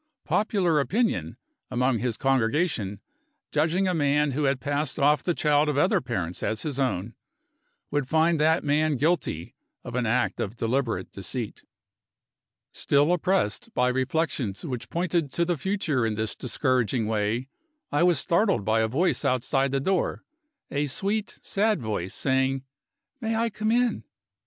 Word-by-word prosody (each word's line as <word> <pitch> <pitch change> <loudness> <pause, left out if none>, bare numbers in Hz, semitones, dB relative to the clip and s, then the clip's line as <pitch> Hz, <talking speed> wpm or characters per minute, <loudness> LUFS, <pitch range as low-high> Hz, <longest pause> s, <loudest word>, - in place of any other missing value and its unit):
Popular 190 -7 +2
opinion, 220 - 0 0.3
among 125 -1 +1
his 120 -1 -2
congregation, 125 - 0 0.5
judging 165 +5 +1
a 185 - +1
man 145 -2 +2
who 145 +3 0
had 135 -1 +1
passed 145 0 -1
off 145 0 +3
the 175 - -1
child 150 0 +3
of 145 - -1
other 185 +5 +3
parents 90 - -3
as 110 -1 -2
his 145 -3 -3
own, 115 -5 -1 0.8
would 145 -3 0
find 160 +2 +3
that 160 +2 +3
man 150 0 +2
guilty 145 - 0 0.3
of - - -7
an 125 -2 0
act 120 +3 +1
of 105 +3 -3
deliberate 115 -4 -1
deceit. 110 +3 -5 1.1
Still 145 +4 +2
oppressed 180 - 0
by 125 0 +3
reflections 130 - -1
which 125 -6 -5
pointed 170 -3 0
to 170 - +1
the 175 0 0
future 155 - -1
in 110 -1 0
this 110 0 -2
discouraging 125 -2 0
way, 110 +3 -1 0.4
I 145 - +1
was 175 -2 +4
startled 185 - +1
by 110 +1 +2
a 110 - +2
voice 155 +11 +1
outside 135 +1 +1
the 135 - +1
door 185 +6 0 0.5
a 145 +1 0
sweet, 200 +9 -2
sad 210 +1 +1
voice 105 -6 -3
saying, 135 0 +1 0.6
"May 225 -2 -1
I 230 +1 0
come 215 +1 -1
in?" 245 0 +1
140 Hz, 150 wpm, -26 LUFS, 125-170 Hz, 1.1 s, was